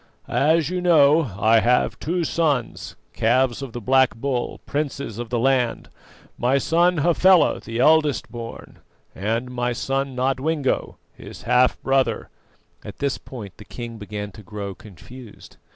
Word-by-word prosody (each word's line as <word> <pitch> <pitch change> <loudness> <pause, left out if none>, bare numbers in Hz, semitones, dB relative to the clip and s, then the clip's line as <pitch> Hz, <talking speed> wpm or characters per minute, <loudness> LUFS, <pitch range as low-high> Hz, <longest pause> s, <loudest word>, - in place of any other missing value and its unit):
As 160 +2 +2
you 180 0 -2
know, 150 - +4
I 110 +2 +4
have 125 +2 +1
two 175 +3 -1
sons, 150 -8 -1 0.2
calves 120 +2 +1
of 135 -3 -6
the 120 - -6
Black 130 +3 +3
Bull, 125 0 -3
princes 140 -6 -4
of 120 -1 -5
the 120 - -1
land 125 -1 0 0.5
my 125 +3 +2
son 170 +5 +2
Hafela, 175 +3 +4
the 115 0 -7
eldest 150 +2 +3
born, 115 -1 -9 0.3
and 115 +6 -2
my 120 -1 -1
son 135 +2 -2
Nodwengo, 135 +3 -1 0.2
his - - -12
half 125 +1 +3
brother 135 -1 0 0.3
" - - -36
At - - -9
this 140 -2 -2
point 110 -7 -10
the 105 - -12
king 115 0 -8
began 105 -1 -6
to 110 - -13
grow 100 0 -6
confused. 110 +5 -14
130 Hz, 150 wpm, -22 LUFS, 115-145 Hz, 0.5 s, know